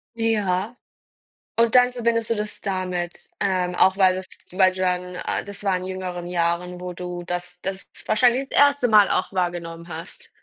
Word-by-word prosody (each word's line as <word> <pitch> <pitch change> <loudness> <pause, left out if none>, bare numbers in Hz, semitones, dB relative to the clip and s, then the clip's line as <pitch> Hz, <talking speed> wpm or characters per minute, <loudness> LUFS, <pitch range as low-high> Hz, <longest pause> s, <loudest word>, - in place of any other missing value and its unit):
Ja, 215 -2 0 0.8
und 230 +1 +4
dann 250 0 +5
verbindest 230 -2 0
du - - +3
das 210 0 -5
damit? 180 -3 -3
Ähm, 180 -2 0
auch 190 0 +4
weil 185 -2 +4
das 185 0 -6 0.2
weil 185 0 +4
du 185 - -10
dann 180 0 -1
äh, - - -3
das 200 0 -10
war 195 -2 +2
in 180 - -5
jüngeren 185 -2 -5
Jahren, 175 +1 -1
wo 180 0 -5
du 180 0 -6
das 175 0 -5
das 190 0 -5 0.2
wahrscheinlich 245 +4 +3
das - - 0
1. 285 -3 +5
Mal 210 -2 +6
auch 185 - 0
wahrgenommen 175 -2 -3
hast? 165 0 -9
185 Hz, 180 wpm, -23 LUFS, 180-215 Hz, 0.8 s, Mal